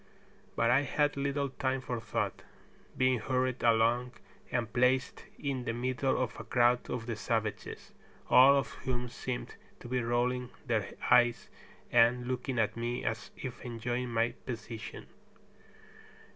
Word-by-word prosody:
But 115 Hz, -, +3 dB
I 135 Hz, +3 st, +5 dB
had 145 Hz, +1 st, +1 dB
little 140 Hz, 0 st, -1 dB
time 130 Hz, 0 st, -1 dB
for 125 Hz, -2 st, -4 dB
thought, 110 Hz, -2 st, -2 dB, 0.6 s
being 130 Hz, -1 st, +3 dB
hurried 130 Hz, +2 st, -1 dB
along 120 Hz, +2 st, +3 dB, 0.4 s
and 115 Hz, -3 st, -1 dB
placed 125 Hz, +2 st, +1 dB
in 135 Hz, -3 st, -3 dB
the 115 Hz, -, -1 dB
middle 130 Hz, +2 st, 0 dB
of 125 Hz, -4 st, -2 dB
a -, -, -5 dB
crowd 120 Hz, 0 st, +2 dB
of 120 Hz, -2 st, -3 dB
the 115 Hz, -2 st, -3 dB
savages, 110 Hz, 0 st, -3 dB, 0.4 s
all 135 Hz, +3 st, +7 dB
of 130 Hz, -5 st, 0 dB
whom 125 Hz, -1 st, -2 dB
seemed 125 Hz, +1 st, -5 dB, 0.2 s
to -, -, -10 dB
be 125 Hz, +1 st, 0 dB
rolling 120 Hz, +1 st, 0 dB, 0.2 s
their 110 Hz, -5 st, 0 dB, 0.2 s
eyes 120 Hz, -1 st, +4 dB, 0.4 s
and 120 Hz, +1 st, +4 dB
looking 130 Hz, 0 st, -2 dB
at 110 Hz, -1 st, +1 dB
me 120 Hz, +2 st, -3 dB
as 115 Hz, +1 st, -3 dB
if 125 Hz, -2 st, -6 dB
enjoying 120 Hz, +1 st, -3 dB
my 115 Hz, 0 st, +1 dB
position. 115 Hz, -2 st, -7 dB
125 Hz, 145 wpm, -31 LUFS, 115-130 Hz, 0.6 s, all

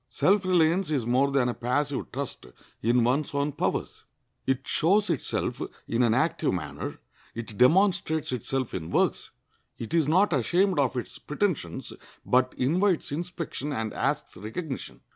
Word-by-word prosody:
Self 195 Hz, +10 st, +2 dB
reliance 175 Hz, 0 st, +3 dB
is 140 Hz, -7 st, 0 dB
more 130 Hz, +4 st, +3 dB
than 135 Hz, -3 st, +2 dB
a 120 Hz, -, 0 dB
passive 135 Hz, +4 st, -1 dB
trust 135 Hz, -, -5 dB, 0.3 s
in 120 Hz, +2 st, +3 dB
one's 140 Hz, +4 st, 0 dB
own 140 Hz, +1 st, +1 dB
powers. -, -, -2 dB, 0.4 s
It 135 Hz, 0 st, 0 dB
shows 195 Hz, +4 st, +3 dB
itself 155 Hz, -, -2 dB, 0.3 s
in 115 Hz, +1 st, +1 dB
an 115 Hz, -2 st, +4 dB
active -, -, +1 dB
manner; -, -, -5 dB, 0.4 s
it 115 Hz, -1 st, -6 dB
demonstrates 160 Hz, -, +3 dB
itself 130 Hz, +1 st, -2 dB
in 80 Hz, -3 st, -4 dB
works. -, -, +1 dB, 0.5 s
It 115 Hz, -, -7 dB
is 165 Hz, -4 st, +3 dB
not 180 Hz, +4 st, +4 dB
ashamed 175 Hz, -, +2 dB
of 130 Hz, -2 st, +1 dB
its 120 Hz, -, -5 dB
pretentions, 150 Hz, -, -2 dB, 0.3 s
but 130 Hz, 0 st, +2 dB
invites 175 Hz, +7 st, +1 dB
inspection 165 Hz, -2 st, -4 dB
and 110 Hz, -5 st, -3 dB
asks -, -, -1 dB
recognition. 130 Hz, -, -6 dB
140 Hz, 145 wpm, -27 LUFS, 125-170 Hz, 0.5 s, an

